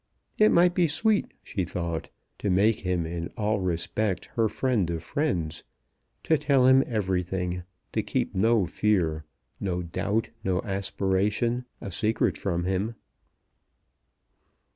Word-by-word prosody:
It 215 Hz, 0 st, +6 dB
might 175 Hz, +1 st, +5 dB
be 175 Hz, -2 st, +3 dB
sweet, 195 Hz, +8 st, +1 dB
she 95 Hz, -, -2 dB
thought, 85 Hz, -2 st, -3 dB, 0.3 s
to 100 Hz, -, -1 dB
make 100 Hz, +4 st, +3 dB
him 90 Hz, -2 st, -1 dB
in 85 Hz, 0 st, -4 dB
all 105 Hz, 0 st, +1 dB
respects 90 Hz, +2 st, -1 dB
her 115 Hz, -3 st, +2 dB
friend 115 Hz, -10 st, 0 dB
of 85 Hz, -1 st, -3 dB
friends; 90 Hz, -, -1 dB, 0.6 s
to 160 Hz, -2 st, +3 dB
tell 140 Hz, -4 st, +3 dB
him 130 Hz, +1 st, +7 dB
everything; 90 Hz, -4 st, -1 dB, 0.3 s
to -, -, +1 dB
keep -, -, -2 dB
no 110 Hz, +1 st, +3 dB
fear, 85 Hz, -5 st, 0 dB, 0.3 s
no 90 Hz, -2 st, -2 dB
doubt, 105 Hz, +6 st, -1 dB
no 90 Hz, -1 st, +1 dB
aspiration 100 Hz, +4 st, 0 dB, 0.2 s
a 100 Hz, -, -6 dB
secret 110 Hz, +5 st, +1 dB
from 85 Hz, -3 st, -1 dB
him. 95 Hz, +5 st, -1 dB
100 Hz, 130 wpm, -27 LUFS, 90-115 Hz, 0.6 s, him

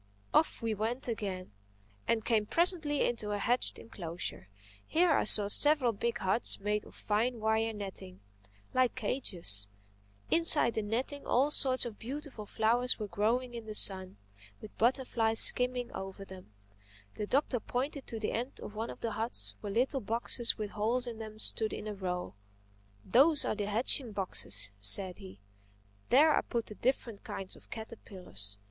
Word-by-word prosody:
Off 315 Hz, -, +1 dB
we 225 Hz, -1 st, -1 dB
went 225 Hz, +5 st, -2 dB
again 195 Hz, -, -5 dB, 0.6 s
and 225 Hz, -2 st, 0 dB
came 215 Hz, -3 st, +1 dB
presently 330 Hz, -, +1 dB
into 230 Hz, -3 st, -3 dB
a -, -, -1 dB
hedged 245 Hz, +5 st, 0 dB
enclosure. 170 Hz, -, -7 dB, 0.4 s
Here 340 Hz, +1 st, +2 dB
I 290 Hz, -, +2 dB
saw 210 Hz, -1 st, +8 dB
several 290 Hz, +3 st, +5 dB
big 235 Hz, +3 st, -3 dB
huts 190 Hz, +4 st, +3 dB
made 210 Hz, +1 st, -2 dB
of -, -, -16 dB
fine 230 Hz, +3 st, -1 dB
wire 220 Hz, +1 st, 0 dB
netting, 190 Hz, -, -8 dB, 0.5 s
like 255 Hz, -1 st, +1 dB
cages. 180 Hz, -, -1 dB, 0.6 s
Inside 315 Hz, -8 st, +4 dB
the 220 Hz, -, -2 dB
netting 245 Hz, +7 st, -4 dB
all 275 Hz, +4 st, +2 dB
sorts 260 Hz, -3 st, +3 dB
of 225 Hz, -3 st, -8 dB
beautiful 260 Hz, -3 st, -8 dB
flowers 235 Hz, +4 st, +1 dB
were 215 Hz, -, -4 dB
growing 240 Hz, +5 st, -1 dB
in 230 Hz, -2 st, -8 dB
the 215 Hz, -, -6 dB
sun, 190 Hz, -, 0 dB, 0.4 s
with 215 Hz, -, -12 dB
butterflies 230 Hz, -2 st, +2 dB
skimming 250 Hz, -1 st, +4 dB
over 195 Hz, +1 st, -8 dB
them. 185 Hz, -, -13 dB, 0.6 s
The 210 Hz, -, -5 dB
Doctor 265 Hz, -1 st, 0 dB
pointed 270 Hz, +5 st, -4 dB
to 225 Hz, -, -6 dB
the 215 Hz, -, -2 dB
end 245 Hz, +4 st, -4 dB
of -, -, -9 dB
one 225 Hz, +2 st, -5 dB
of -, -, -10 dB
the 230 Hz, -, -3 dB
huts 225 Hz, +3 st, 0 dB
where 205 Hz, -, -5 dB
little 255 Hz, +5 st, 0 dB
boxes 230 Hz, +2 st, +3 dB
with 210 Hz, -2 st, -5 dB
holes 230 Hz, +4 st, -1 dB
in 235 Hz, -2 st, -7 dB
them 215 Hz, -1 st, -9 dB
stood 220 Hz, 0 st, -1 dB
in -, -, -7 dB
a 215 Hz, -, -4 dB
row. 180 Hz, -, -5 dB, 0.7 s
"Those 290 Hz, +4 st, +4 dB
are -, -, -1 dB
the 205 Hz, -1 st, -4 dB
hatching 230 Hz, +2 st, +1 dB
boxes," 105 Hz, -, 0 dB
said 180 Hz, -, +6 dB
he. 95 Hz, +1 st, -12 dB, 0.7 s
"There 300 Hz, +4 st, +5 dB
I -, -, +2 dB
put 235 Hz, -2 st, -4 dB
the -, -, -9 dB
different 235 Hz, -2 st, -2 dB
kinds 190 Hz, -1 st, -7 dB
of -, -, -18 dB
caterpillars. 185 Hz, -, -6 dB
225 Hz, 165 wpm, -31 LUFS, 205-250 Hz, 0.7 s, saw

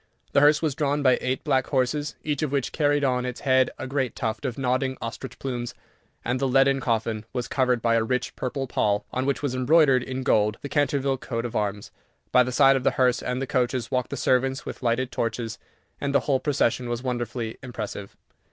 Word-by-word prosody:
The 140 Hz, -, +4 dB
hearse 150 Hz, +2 st, +5 dB
was 155 Hz, -3 st, +1 dB
drawn 145 Hz, +1 st, 0 dB
by 130 Hz, -2 st, +4 dB
eight 130 Hz, +1 st, -2 dB
black 135 Hz, -4 st, +1 dB
horses, 145 Hz, +2 st, 0 dB
each 150 Hz, -3 st, -1 dB
of 155 Hz, -3 st, -1 dB
which 140 Hz, -3 st, -1 dB
carried 145 Hz, -2 st, +1 dB
on 125 Hz, -2 st, +1 dB
its 125 Hz, -1 st, -5 dB
head 130 Hz, -1 st, +3 dB
a -, -, -5 dB
great 130 Hz, -1 st, -2 dB
tuft 110 Hz, +1 st, -3 dB
of 125 Hz, -3 st, -3 dB
nodding 130 Hz, 0 st, 0 dB
ostrich 115 Hz, +3 st, -6 dB
plumes, 120 Hz, -3 st, -4 dB, 0.5 s
and 125 Hz, +2 st, 0 dB
the 135 Hz, -, +1 dB
leaden 135 Hz, +1 st, +4 dB
coffin 115 Hz, -3 st, -1 dB
was 125 Hz, -2 st, -2 dB
covered 125 Hz, -3 st, +1 dB
by 115 Hz, -, +3 dB
a 115 Hz, -1 st, +3 dB
rich 125 Hz, +2 st, -2 dB
purple 135 Hz, +1 st, -3 dB
pall, 105 Hz, -4 st, 0 dB
on 130 Hz, +1 st, -1 dB
which 140 Hz, +1 st, -1 dB
was 140 Hz, -3 st, -1 dB
embroidered 135 Hz, 0 st, +4 dB
in 130 Hz, +1 st, -4 dB
gold 105 Hz, -3 st, +2 dB
the 140 Hz, -, -5 dB
Canterville 140 Hz, -2 st, +1 dB
coat 115 Hz, -1 st, -4 dB
of 120 Hz, -, -5 dB
arms. 105 Hz, -1 st, -2 dB, 0.4 s
By 125 Hz, -, +6 dB
the 125 Hz, 0 st, 0 dB
side 135 Hz, +1 st, +5 dB
of 130 Hz, -, -1 dB
the -, -, +4 dB
hearse 125 Hz, -1 st, +3 dB
and 125 Hz, 0 st, -2 dB
the 135 Hz, -, -2 dB
coaches 125 Hz, -2 st, -1 dB
walked 125 Hz, -1 st, 0 dB
the -, -, -4 dB
servants 130 Hz, +2 st, +1 dB
with -, -, -7 dB
lighted 125 Hz, +1 st, 0 dB
torches, 115 Hz, -1 st, -3 dB, 0.4 s
and 140 Hz, 0 st, -2 dB
the -, -, +5 dB
whole 135 Hz, -2 st, +1 dB
procession 125 Hz, -4 st, 0 dB
was 120 Hz, +1 st, -3 dB
wonderfully 120 Hz, -2 st, -3 dB
impressive. 105 Hz, -6 st, -7 dB
130 Hz, 215 wpm, -25 LUFS, 120-135 Hz, 0.5 s, By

